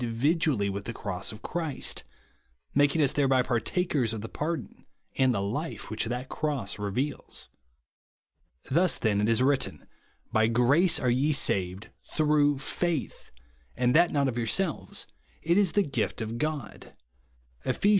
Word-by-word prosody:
dividiially 125 - +1
with 100 0 -4
the 115 - -4
cross 100 -5 -3
of 110 - -12
Christ; 160 -5 -2 0.7
making 145 +3 +3
lis 140 -2 +3
thereby 135 -3 +3
partakers 130 0 0
of 110 - -4
the 115 - -5
pardon 165 +2 -4 0.3
and 130 -1 +3
the 100 -4 0
life 145 +12 -3
v/hich 110 +1 -1
that 125 +3 -3
cross 135 -11 -3
reveals. 115 +9 -3 1.2
Thus 175 +5 +3
then 105 -3 +1
it 105 - +2
is 115 +2 +3
written, 130 - +1 0.5
"By 110 0 +3
grace 130 +10 +3
are 125 - +2
ye 140 +5 +2
saved, 95 -4 0 0.2
through 150 -2 +3
faith; 160 +2 -2 0.5
and 125 0 +2
that 170 +3 +5
not 140 -2 +2
of 120 -2 -2
yourselves: 155 - -1 0.4
it 170 +2 +2
is 195 -5 +3
the 205 - +4
gift 135 - -2
of 115 +1 -4
God," 155 -1 -4 0.7
(Eph. 130 - -2
ii. - - +7
130 Hz, 150 wpm, -28 LUFS, 115-150 Hz, 1.2 s, ii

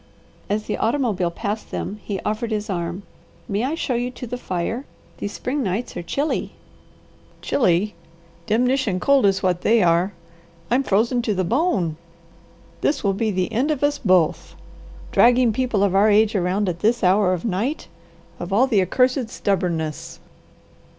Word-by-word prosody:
As 210 +1 0
the - - -3
automobile 225 -8 0
passed 210 +4 -4
them 210 - -5
he 200 -2 -3
offered 215 +2 -2
his 210 -2 -2
arm. 175 +1 -3 0.4
"May 205 +2 -1
I 280 +5 -1
show 290 -5 -2
you 245 +1 -1
to 250 0 -8
the 245 +1 -5
fire? 225 +3 -3 0.3
These 205 - -4
spring 275 +3 -2
nights 210 +2 -3
are - - -3
chilly." 280 - -2 0.9
"'Chilly!' 205 -3 +1 0.5
Demnition 245 -3 +1
cold 275 +1 +4
is 190 -1 +1
what 180 -1 +1
they 225 -2 +3
are! 170 +3 +3 0.6
I'm 250 +3 +4
frozen 235 +1 +1
to 220 -3 -1
the 185 - 0
bone! 195 - 0 0.8
This 285 -2 0
will 200 -1 +2
be 220 +3 -1
the 185 +1 -1
end 255 +7 +1
of 295 -2 -1
us 290 0 +1
both! 180 -5 +1 0.6
Dragging 245 -1 +4
people 240 -4 0
of 200 -2 +2
our 200 +3 +5
age 215 +1 +4
around 190 +1 0
at 175 -1 -2
this 230 +3 +1
hour 185 +1 +4
of 180 +2 -4
night. 225 +9 -2 0.5
Of 175 +2 -6
all 225 +7 +4
the 220 -7 +2
accursed 250 +5 +1
stubbornness!" 170 - -2
210 Hz, 165 wpm, -22 LUFS, 185-245 Hz, 0.9 s, our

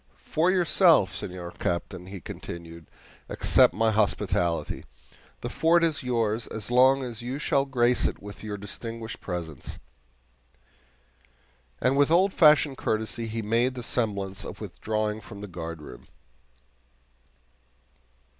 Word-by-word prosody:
"For 165 +4 +2
yourself, 170 - +4
Senor 90 -2 -6
Captain," 90 +1 -3
he 95 0 -7
continued, 85 0 -9 0.4
"accept - - +5
my 110 0 +1
hospitality. 90 -5 0 0.6
The - - -4
fort 170 +1 +3
is 160 -3 +1
yours 115 -3 -1
as 110 +2 -6
long 130 +2 +5
as 120 -2 -5
you 125 +3 -4
shall 140 -2 +1
grace 125 -2 +2
it - - -1
with 100 +1 -10
your 105 -1 -4
distinguished 115 +3 -6
presence"; 85 -6 -5 2.0
and 130 +2 +2
with 140 +1 +4
old 185 +4 +4
fashioned 150 -4 +5
courtesy, 110 +1 -2
he 115 0 -4
made 120 +4 +1
the 125 - -6
semblance 100 -5 -2
of - - -8
withdrawing 110 0 -3
from 105 -1 -11
the 105 - -6
guardroom. 80 -8 -8
110 Hz, 125 wpm, -27 LUFS, 95-130 Hz, 2.0 s, accept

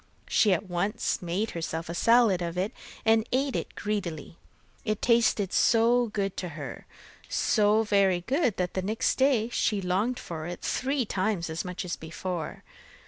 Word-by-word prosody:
She 210 - +3
at 185 +2 0
once 195 +5 -1
made 185 +5 -2
herself 165 -1 -4
a 170 - -4
salad 230 -1 +4
of 170 0 -3
it, 190 +4 0 0.3
and 220 0 +3
ate 270 +1 +1
it - - -4
greedily. 180 -7 -4 0.4
It 215 -2 -1
tasted 230 -5 +2
so 235 +1 +4
good 200 -3 -2
to 180 - -3
her 145 -3 -7 0.4
so 215 0 +3
very 195 -4 +3
good, 255 - 0
that 180 -1 -1
the 190 - -1
next 215 +7 0
day 255 -4 +3
she 215 -3 0
longed 195 +7 0
for 160 -1 -6
it 175 0 -6
three 265 -1 0
times 190 -4 -1
as 160 - -3
much 180 0 -5
as 175 - -3
before. 170 +1 -5
200 Hz, 165 wpm, -28 LUFS, 175-225 Hz, 0.4 s, salad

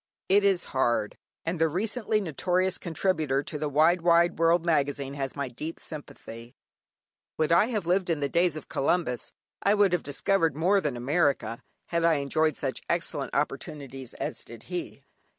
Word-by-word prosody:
It 200 +2 +4
is 195 -3 +3
hard! 120 -5 +1 0.3
and 165 0 -2
the 165 - +4
recently 215 +5 0
notorious 180 +1 0
contributor 160 -5 0
to 150 - -5
the 150 0 -1
"Wide 160 +5 +4
Wide 170 -1 +3
World" 165 +1 +3
Magazine 140 -4 0
has 135 -1 -4
my 140 -2 -2
deep 150 +7 -6
sympathy. 120 -6 -9 0.8
Would 155 0 +1
I 170 +6 +5
had 215 -7 -2
lived 180 +1 +1
in 165 -3 +1
the 140 - 0
days 170 +2 +2
of 155 - -7
Columbus; 135 -4 -1 0.3
I 200 +1 +3
would 200 -3 +3
have 180 - +2
discovered 165 +2 +1
more 185 +6 +3
than 140 -7 -2
America, 140 -2 0 0.3
had 170 -1 0
I 165 -1 +4
enjoyed 150 +1 0
such - - -3
excellent - - -2
opportunities 135 -4 -4
as - - -5
did - - -12
he. - - -6
160 Hz, 170 wpm, -27 LUFS, 140-180 Hz, 0.8 s, I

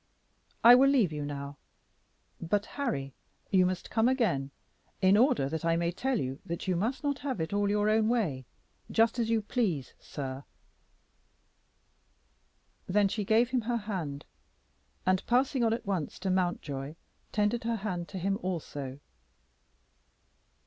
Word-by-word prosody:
I 240 - +10
will 265 +2 +7
leave 240 - +3
you 150 -1 -3
now; 140 0 -6 0.8
but, 205 +5 0
Harry, 175 - -3 0.4
you 185 -2 +5
must 185 0 -4
come 225 +2 +3
again, 215 - +1 0.5
in 190 0 +5
order 210 - +3
that 160 +2 -4
I 165 0 +2
may 170 0 0
tell 255 +7 -1
you 130 +1 -3
that 170 +3 -5
you 185 - +2
must 225 - -1
not 285 -1 -1
have 265 -8 -3
it 160 +3 -2
all 205 0 +1
your 205 0 +2
own 215 0 +3
way, 160 - -1 0.4
just 225 +2 +2
as 230 -1 0
you 225 -2 +1
please, 200 - -1
sir." 135 -1 -6 2.4
Then 200 +1 +3
she 210 +1 -2
gave 225 +4 +3
him 255 -2 +1
her 235 +2 -1
hand, 180 -10 -4 0.8
and 185 0 +2
passing 255 +1 +2
on 225 - +3
at 230 - -2
once 185 -7 -2
to 190 0 0
Mountjoy, 155 -6 -2 0.4
tendered 210 +3 +1
her 230 0 +1
hand 185 -5 -3
to 195 - -7
him 195 +3 -1
also. 145 -7 -4
195 Hz, 150 wpm, -30 LUFS, 160-230 Hz, 2.4 s, I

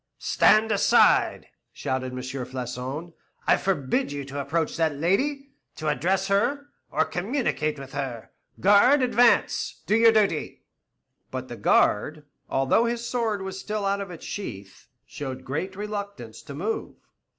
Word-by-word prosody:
"Stand 215 +1 +4
aside!" 205 - +4 0.3
shouted 130 -1 -3
M. - - -5
Floçon; 130 +4 -5 0.3
"I - - +5
forbid 190 - 0
you 140 -1 -5
to 140 +1 -5
approach 160 +3 -1
that 160 -3 +1
lady, 275 - 0 0.2
to 155 -1 -2
address 190 +5 0
her, 280 +9 0 0.2
or - - +1
communicate 180 - -1
with 135 -1 -10
her. 130 -5 -5 0.3
Guard, 205 +8 +5
advance, 245 -1 +2
do 215 - +2
your 225 0 +6
duty." 205 -8 0 0.7
But - - -6
the - - -6
guard, 150 +8 +2 0.2
although 135 - +2
his 235 0 -2
sword 225 -5 -1
was 190 0 -5
still 210 0 -3
out 200 0 0
of 200 - -6
its 170 -3 -9
sheath, 100 - -7 0.2
showed 130 -2 -7
great 185 +8 -3
reluctance 200 - -6
to 140 - -9
move. 205 +9 -3
180 Hz, 140 wpm, -25 LUFS, 140-215 Hz, 0.7 s, your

